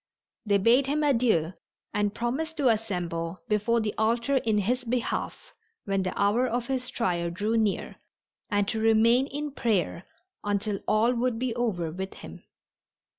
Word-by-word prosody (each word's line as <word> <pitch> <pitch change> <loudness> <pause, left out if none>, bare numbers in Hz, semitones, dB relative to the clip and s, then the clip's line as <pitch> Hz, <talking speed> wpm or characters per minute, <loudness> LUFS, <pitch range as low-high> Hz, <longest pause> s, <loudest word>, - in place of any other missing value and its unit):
They 200 -1 +4
bade 240 +7 +4
him 300 +2 0
adieu 230 - +2 0.4
and 205 0 0
promised 310 +7 -2
to 275 -4 +3
assemble 175 -6 -2
before 215 +2 +2
the 215 -1 -2
altar 235 +5 +2
in 220 -4 +1
his 245 +6 0
behalf 240 0 -3 0.3
when 195 -1 0
the 185 -1 -3
hour 210 +5 +3
of 240 0 -1
his 260 -1 -2
trial 175 -6 -1
drew 205 +6 -1
near 215 -3 0 0.5
and 205 -1 +1
to 220 - -1
remain 225 +4 +4
in 295 +1 -4
prayer 200 - -1 0.4
until 205 0 -1
all 220 +3 +3
would 245 -1 0
be 250 0 -1
over 185 -10 -1
with 190 +3 -6
him. - - -10
225 Hz, 155 wpm, -27 LUFS, 200-245 Hz, 0.5 s, They